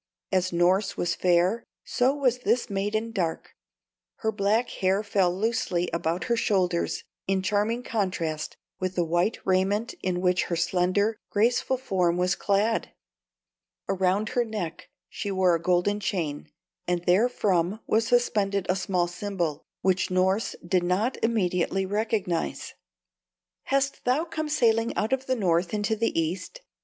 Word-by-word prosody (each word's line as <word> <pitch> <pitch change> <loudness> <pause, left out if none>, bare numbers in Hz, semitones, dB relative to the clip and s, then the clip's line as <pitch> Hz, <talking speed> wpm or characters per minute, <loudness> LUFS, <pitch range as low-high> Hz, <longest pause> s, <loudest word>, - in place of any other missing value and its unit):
As 185 -1 +2
Norss 180 +4 +2
was 175 - 0
fair, 180 +6 +2 0.2
so 260 +3 +1
was 255 -4 +1
this 245 -2 0
maiden 210 +3 -1
dark; 175 -7 -3 0.7
her 220 - +3
black 210 +3 +1
hair 190 +2 +1
fell 195 -4 +2
loosely 185 -3 -1
about 170 +1 -1
her 235 - +1
shoulders 185 -7 0 0.2
in 190 -1 +1
charming 210 +5 0
contrast 175 -9 -2 0.2
with 185 0 -2
the 175 - +1
white 175 +6 +1
raiment 195 +4 +1
in 180 -1 -1
which 180 0 +2
her 170 - -2
slender, 185 +5 +1
graceful 240 +4 +2
form 180 -8 0
was 180 0 +2
clad. 205 +3 +1 1.0
Around 190 +2 +1
her 245 - +1
neck 210 -8 -5 0.2
she 205 - -5
wore 190 -2 +3
a 165 - 0
golden 180 +4 +1
chain, 165 -9 -3 0.4
and 175 0 -1
therefrom 190 -1 +2
was 225 +1 +1
suspended 205 -6 +1
a 185 - +3
small 185 -2 0
symbol, 175 -4 -3 0.2
which 185 -1 +1
Norss 190 +3 +1
did 180 0 +2
not 190 +8 0
immediately 190 -4 +1
recognize. 205 -4 -2 0.9
"Hast 275 0 0
thou 265 +7 +1
come 315 -2 -4
sailing 230 -5 +2
out 220 +5 0
of 265 0 -1
the 260 - +1
North 175 -3 +1
into 210 +1 0
the 230 -5 0
East?" 180 - -3
195 Hz, 145 wpm, -26 LUFS, 180-225 Hz, 1.0 s, her